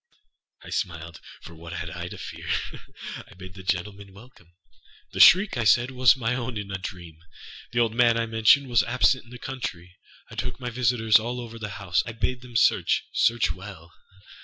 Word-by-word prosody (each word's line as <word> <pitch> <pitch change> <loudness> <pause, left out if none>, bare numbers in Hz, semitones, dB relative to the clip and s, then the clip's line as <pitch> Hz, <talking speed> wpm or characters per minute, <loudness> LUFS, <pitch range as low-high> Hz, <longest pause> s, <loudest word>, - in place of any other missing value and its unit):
I - - -11
smiled, 85 -1 -4 0.2
âfor 85 - -11
what 85 +1 -10
had 85 -1 -5
I 90 0 -6
to - - -9
fear? - - -8 0.8
I - - -17
bade 95 +1 -11
the 95 - -11
gentlemen 100 +2 -3
welcome. 100 -5 -18 0.6
The - - -6
shriek, 190 -5 +7
I 120 - 0
said, 120 +3 +3
was 130 -1 +5
my 120 -1 -1
own 125 -2 -4
in 100 -1 -6
a 95 - -3
dream. 85 -4 -9 0.5
The 120 0 +1
old 115 -2 +1
man, 120 -1 +4
I 115 - 0
mentioned, 115 +5 +4
was 120 -2 +3
absent 130 +1 +1
in - - -19
the 125 - -10
country. 90 -9 -7 0.3
I - - -10
took - - -5
my 125 -2 -5
visitors 115 -2 +3
all 120 +3 -4
over 115 -1 -8
the 105 -1 -5
house. 90 -4 0
I 115 - -7
bade 120 +2 -2
them 120 -1 -13
searchâsearch 115 +1 +2
well. 90 -3 -12
110 Hz, 190 wpm, -25 LUFS, 90-120 Hz, 0.8 s, shriek